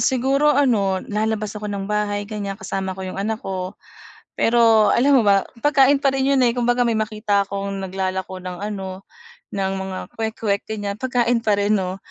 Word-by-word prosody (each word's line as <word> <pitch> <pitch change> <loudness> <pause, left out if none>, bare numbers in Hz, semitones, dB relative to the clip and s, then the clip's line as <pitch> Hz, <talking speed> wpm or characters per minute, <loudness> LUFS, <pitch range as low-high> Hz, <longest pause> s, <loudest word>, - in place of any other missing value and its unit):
siguro 270 +3 +2
ano, 205 -9 +2
lalabas 215 -1 -2
ako 210 -1 -6
ng 200 -1 -3
bahay 205 -1 -1
gan'yan, 200 -2 -5
kasama 190 -1 -4
ko 190 - -6
yung 185 +1 -5
anak 220 +2 -2
ko. 185 -1 -4 0.6
Pero 225 -2 +4
alam 275 +2 +4
mo - - +4
ba 200 -1 +5 0.2
pagkain 285 -1 +5
pa 275 -1 +1
rin 270 0 +1
'yon, 275 -2 +3
eh, 235 - +2
kumbaga 245 0 +1
may 230 - +1
makita 215 -2 0
akong 195 0 -4
naglalako 190 0 -3
ng 180 -1 -7
ano, 195 -2 -5 0.5
ng 195 -1 -2
mga 190 -1 -5 0.2
kwek-kwek 220 -2 -2
gan'yan, 205 -1 -4
pagkain 245 -2 +1
pa 210 -2 +2
rin 205 +1 +2
'no, 190 -1 -1
210 Hz, 180 wpm, -21 LUFS, 195-235 Hz, 0.6 s, ba